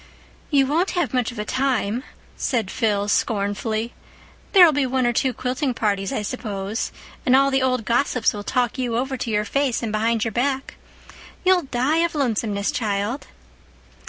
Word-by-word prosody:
"You 275 -3 +4
won't 325 +8 +1
have 345 - 0
much 250 -2 +1
of 235 - -12
a 210 - -3
time," 255 -2 0 0.3
said 230 -8 -1
Phil 205 -4 0
scornfully. 215 +2 -1 0.6
"There'll 360 -5 +8
be 285 -2 +1
one 255 0 +1
or 240 - +2
two 260 +2 +1
quilting 255 +2 -2
parties, 200 -3 0
I - - -2
suppose; 210 -2 -3 0.3
and 255 -4 +4
all 275 +1 +4
the 270 0 +2
old 255 -3 0
gossips 245 0 +1
will 205 - -5
talk 250 +2 0
you 240 -3 -1
over 265 +2 -1
to 245 - -4
your 210 -1 +1
face 275 -1 0
and 225 - -2
behind 225 +1 +1
your 225 - -1
back. 265 +4 -1 0.7
You'll 365 -5 +4
die 260 +6 +1
of 335 -1 +1
lonesomeness, 220 -7 0
child." 210 +3 -2
245 Hz, 170 wpm, -22 LUFS, 215-270 Hz, 0.7 s, There'll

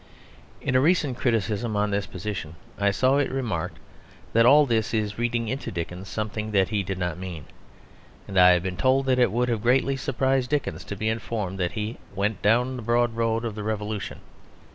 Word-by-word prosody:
In - - -1
a 130 - +5
recent 150 -4 +2
criticism 115 -2 0
on 105 0 +1
this 100 0 -1
position 90 -4 -5 0.2
I 100 0 +3
saw 130 +7 +2
it 145 - +1
remarked 130 -6 -3 0.6
that 115 +1 +5
all 150 +3 +7
this 115 -3 0
is 105 -1 -2
reading 120 -1 0
into 130 +5 -3
Dickens 90 +2 -5
something 110 0 -3
that 95 -2 +3
he 105 -2 0
did 95 0 -4
not 90 -2 -3
mean; 90 -7 -7 0.8
and 100 - -7
I 90 -1 +8
have 90 -1 +1
been 90 -1 -3
told 135 +1 +3
that 130 -1 +2
it 120 -6 +4
would 120 +3 +1
have 115 -3 -1
greatly 130 +3 +2
surprised 135 -1 0
Dickens 150 -2 -1
to 100 - -5
be 110 +3 -3
informed 110 -4 -3
that 90 -1 -1
he 110 +1 -4 0.2
"went 105 +3 -1
down 125 +5 +2
the - - -6
broad 120 +1 +1
road 115 0 0
of 115 - -3
the 105 - -6
Revolution." 105 -1 -4
110 Hz, 200 wpm, -25 LUFS, 100-125 Hz, 0.8 s, I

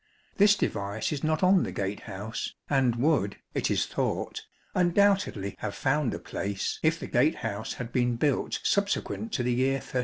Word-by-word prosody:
This 205 0 +6
device 100 - -2
is 145 -3 -3
not 155 +2 +1
on 185 0 +6
the - - -2
gate 100 +1 -3
house, 105 +5 -5
and 130 -4 +2
would, 120 -6 +1 0.2
it - - 0
is - - +2
thought, - - -3 0.3
undoubtedly 185 - +2
have 100 - -4
found 135 -1 +1
a - - -6
place 100 -1 -3
if 160 +1 +2
the - - -5
gate 135 +6 +2
house 110 0 -3
had 120 -1 -6
been 120 -1 +2
built 140 +2 0
subsequent 200 +2 0
to 125 - 0
the 125 0 +1
year 130 +2 +2
1330. 135 -1 -3
130 Hz, 180 wpm, -28 LUFS, 110-165 Hz, 0.3 s, This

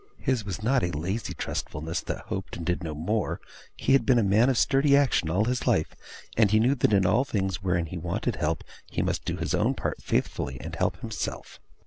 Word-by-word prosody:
His 130 -4 0
was 100 +1 -5
not 130 +4 +3
a 90 - +1
lazy 90 +8 -3
trustfulness 80 +3 -3
that - - -4
hoped, 95 - -5
and 85 - -6
did 90 +1 0
no 80 -3 -4
more. 100 +7 -1 0.4
He - - +2
had 135 - +5
been 130 -3 +4
a 115 - +4
man 105 +6 +4
of 130 - +1
sturdy 140 +2 +4
action 130 - +2
all 95 +6 +2
his 125 +1 -1
life, 80 - +2 0.4
and 110 -2 +4
he 110 +2 +4
knew 125 +5 +4
that 125 - +2
in 100 -2 +4
all 105 +8 +4
things 95 -7 -2
wherein 90 -3 +1
he 85 +2 -6
wanted 95 +7 -2
help 75 +1 -1 0.3
he - - -1
must - - -2
do - - -2
his - - -2
own - - +2
part - - -3
faithfully, 65 - -1
and - - -6
help - - -1
himself. - - -5
100 Hz, 220 wpm, -27 LUFS, 85-120 Hz, 0.4 s, had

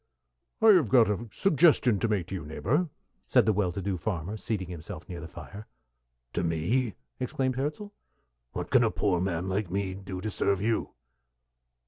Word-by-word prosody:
"I 225 - +8
have 175 - +6
got 115 -1 +5
a 110 +4 -3
suggestion 150 - +4
to 115 - +1
make 105 -6 0
to - - -5
you, 95 - -4
neighbor," 125 - 0 0.4
said 125 -5 +4
the 110 - +3
well 95 -3 +1
to 95 +2 -5
do 95 -1 -1
farmer, 90 +1 -3
seating 105 -3 -3
himself 85 -2 -8
near 90 -2 -6
the 85 - -7
fire. 100 +5 -10 0.7
"To 85 - -1
me!" 90 +9 0 0.2
exclaimed 130 0 -1
Hirzel. 150 +10 -3 0.6
"What - - -5
can - - +6
a - - +3
poor 90 -4 0
man 90 -1 -1
like 95 0 -1
me 95 0 -1
do 95 -1 -7
to 110 +3 -3
serve 100 -1 +1
you?" 110 +3 -1
100 Hz, 180 wpm, -28 LUFS, 90-120 Hz, 0.7 s, I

